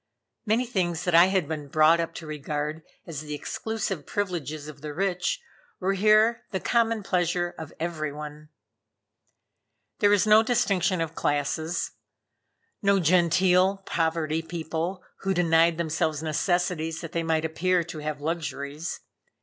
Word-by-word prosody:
Many 225 +4 +2
things 180 -8 -1
that 180 - -1
I 170 +2 +8
had 190 -5 +1
been 150 -2 -4
brought 155 +3 +5
up 165 0 -3
to 165 - -7
regard 150 +1 -4 0.2
as 155 -4 -6
the 150 -1 -5
exclusive 195 -1 -4
privileges 160 -7 -3
of 145 -2 -10
the 150 -1 -6
rich, 195 - 0 0.4
were 190 +1 +1
here 215 +3 +4
the 190 - -2
common 230 -1 +1
pleasure 175 -1 0
of 160 -2 -8
every 160 -2 -2
one. 150 +1 -9 1.5
There 205 - +5
was 205 -1 +4
no 215 +1 +7
distinction 200 -7 +1
of 165 -1 -2
classes; 155 +3 -1 0.9
no 200 -1 +4
genteel 180 +3 +3
poverty 160 -1 0
people, 170 +2 -4 0.2
who 195 0 -1
denied 165 -1 +4
themselves 160 -2 -1
necessities 165 0 0
that 165 - -7
they 170 - -1
might 160 -1 0
appear 175 +2 +1
to 165 -2 -8
have 150 -1 -4
luxuries. 155 0 -4
170 Hz, 140 wpm, -26 LUFS, 155-190 Hz, 1.5 s, I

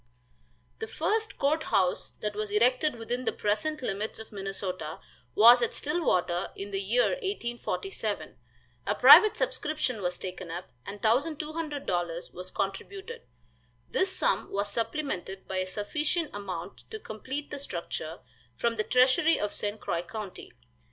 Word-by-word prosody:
The 445 - -4
first 440 -2 -1
court 310 +3 +1
house 185 -2 +1
that 210 0 -1
was 215 0 -2
erected 250 +7 +3
within 240 +2 -3
the - - +2
present 260 +8 -1
limits 210 0 -2
of 220 - -9
Minnesota 195 -5 -4 0.4
was 240 +3 +9
at 235 - 0
Stillwater, 190 - 0
in 200 +1 -6
the 195 0 -1
year 230 +6 +3
1847. 390 - -3 0.5
A - - +2
private 430 - +9
subscription 305 - -1
was 180 -1 -1
taken 185 -1 -6
up, 175 +2 -6 0.2
and 205 +2 -7
$1,200 285 - -1
was 180 +1 -6
contributed. 395 - -4 0.7
This 380 - +3
sum - - +1
was 200 +1 -1
supplemented 225 - -3
by 190 - -3
a 185 0 0
sufficient 300 - -1
amount 190 -3 -6
to 440 - -5
complete 265 - -6
the 290 - -4
structure, 170 - -5 0.4
from 235 -1 0
the 215 - +1
treasury 255 +7 +4
of 210 - -1
St. 205 +1 -2
Croix 170 - -1
county. 205 +1 -7
220 Hz, 140 wpm, -29 LUFS, 195-300 Hz, 0.7 s, was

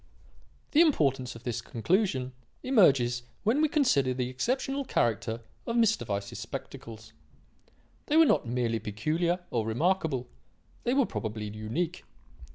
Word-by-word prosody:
"The 305 - +6
importance 135 - +2
of 115 - -11
this 120 -2 -3
conclusion 130 - 0 0.3
emerges 135 - +4 0.2
when 230 +8 +2
we 310 - +3
consider 140 - +2
the 125 -1 -2
exceptional 260 - -1
character 115 - 0 0.3
of 230 - -1
Mr. 220 - +2
Weiss's 100 -1 -3
spectacles. 110 -1 -8 0.9
They 300 - +3
were 325 - +8
not 195 - +2
merely 115 -1 0
peculiar 160 - -1
or 115 -2 0
remarkable; 145 - 0 0.6
they 245 - +2
were 275 -2 +4
probably 110 - -4
unique. 160 +12 -3
130 Hz, 130 wpm, -29 LUFS, -, 0.9 s, were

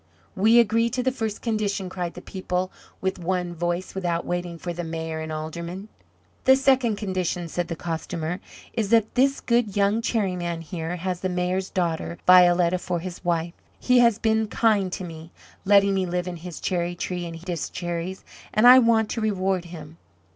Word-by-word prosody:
"We 220 +5 +5
agree 230 +1 +3
to 250 +1 -2
the 260 - +2
first 220 -5 -4
condition!" 210 -4 -1
cried 180 -2 -4
the - - -9
people 185 -1 -3 0.3
with 190 0 -1
one 180 0 -2
voice, 175 +2 -2
without 175 -3 -2
waiting 175 -1 -3
for 175 +1 -5
the 175 +1 -4
Mayor 160 -1 -4
and 160 0 -5
Aldermen. 170 +6 -6 0.6
"The 265 - +7
second 265 -4 +3
condition," 185 -4 -2
said 175 +2 -3
the 165 - -4
Costumer, 165 +1 -4 0.3
"is 220 -4 -1
that 225 -1 +3
this 270 +2 +3
good 235 -4 0
young 200 +3 +2
Cherry 205 -5 0
man 170 -2 -3
here 165 +1 -4
has 180 0 -3
the 185 - -2
Mayor's 180 +1 -1
daughter, 170 -1 -2
Violetta, 180 -1 +6
for 180 -1 -2
his 180 +1 -7
wife. 170 -1 -1 0.3
He 250 -1 +4
has 235 -3 +5
been 220 -1 +1
kind 210 -4 +2
to 185 - -4
me, 165 -1 -9 0.3
letting 200 0 +5
me 190 -1 0
live 180 +1 -2
in 175 -1 -5
his 175 0 -8
cherry 175 -1 -1
tree 175 0 -4
and 165 - -7
eat 165 +3 -12
his 170 -4 -3
cherries 175 +1 -4 0.3
and 215 - +3
I 250 +1 +10
want 230 -2 +3
to 230 - -2
reward 190 -4 0
him." 165 -2 -10
180 Hz, 190 wpm, -24 LUFS, 170-210 Hz, 0.6 s, I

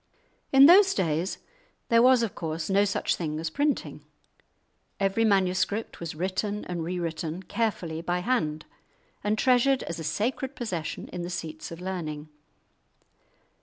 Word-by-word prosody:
In 270 0 +8
those 385 +4 +7
days 165 +3 -1 0.5
there 230 0 +5
was, 255 -1 +5
of 225 - -2
course, 160 +2 -4
no 200 +1 +4
such 200 - 0
thing 155 -3 -3
as 160 0 -3
printing. 290 - -1 1.0
Every 195 +3 +1
manuscript 200 +1 +1
was 165 -2 -5
written 190 +4 -2
and 175 -2 -4
rewritten, 170 0 -3
carefully, 180 -8 -2
by 175 +1 -1
hand, 160 -9 -1 0.6
and 210 +1 +1
treasured 255 +2 +3
as 165 0 -5
a - - -5
sacred 255 - -2
possession 180 -10 -4
in 180 - -5
the 175 - -4
seats 160 -3 -6
of 165 - -9
learning. 155 -5 -5
185 Hz, 140 wpm, -27 LUFS, 165-225 Hz, 1.0 s, In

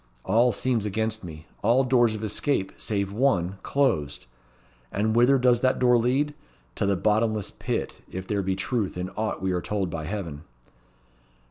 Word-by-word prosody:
All 115 +6 +4
seems 115 -1 0
against 110 +1 -2
me; 80 -3 -9 0.2
all 120 +5 +4
doors 120 -3 +3
of 110 - -6
escape 110 -1 0
save 100 -2 -2
one 100 -6 +1
closed. 75 - 0 0.7
And 110 +2 0
whither 125 +4 +5
does 125 -2 +3
that 130 0 +2
door 125 -1 +4
lead? 130 +5 +1 0.4
To - - 0
the 100 -1 +2
Bottomless 110 +1 +1
Pit, - - -4
if 95 0 -5
there 100 0 -1
be 95 0 -1
truth 100 -1 -2
in 90 +1 -4
aught 105 -1 -3
we 95 - +1
are 90 -1 -1
told 100 -3 -2
by 80 -2 -4
Heaven." 85 -5 -5
105 Hz, 165 wpm, -26 LUFS, 95-120 Hz, 0.7 s, whither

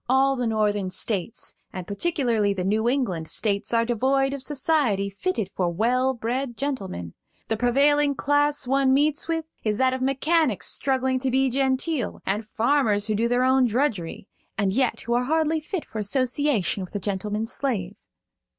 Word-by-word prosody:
All 270 +1 +3
the 250 -2 -1
Northern 210 -3 0
States, 200 +2 -2 0.2
and 185 -2 -6
particularly 225 - 0
the 185 - -2
New 215 +5 +1
England 195 - -1
States, 200 +1 -1
are 230 -1 +2
devoid 270 +4 +1
of 280 - -4
society 260 -8 0
fitted 220 - -2
for 180 -2 0
well 250 +8 +1
bred 240 +1 -3
gentlemen. 195 - -4 0.4
The 225 - 0
prevailing 280 +4 +3
class 290 0 +1
one 265 +1 +3
meets 295 +3 +2
with 325 -1 -1 0.2
is 210 -2 0
that 260 +1 +2
of 260 - -3
mechanics 270 - +1
struggling 260 -1 0
to 260 0 -1
be 265 0 +2
genteel, 265 0 -1
and 205 +3 -1
farmers 225 -3 +1
who 215 - 0
do 225 +3 +1
their 245 +1 +2
own 260 0 +4
drudgery, 225 - -1 0.3
and 200 -3 +1
yet 255 +1 0
who 235 - -2
are 245 +1 +1
hardly 315 +2 +1
fit 320 +3 -5
for 220 - -6
association 255 - +1
with 185 - -10
a - - 0
gentleman's 210 +3 -3
slave. 205 -9 -2
250 Hz, 170 wpm, -24 LUFS, 210-275 Hz, 0.4 s, own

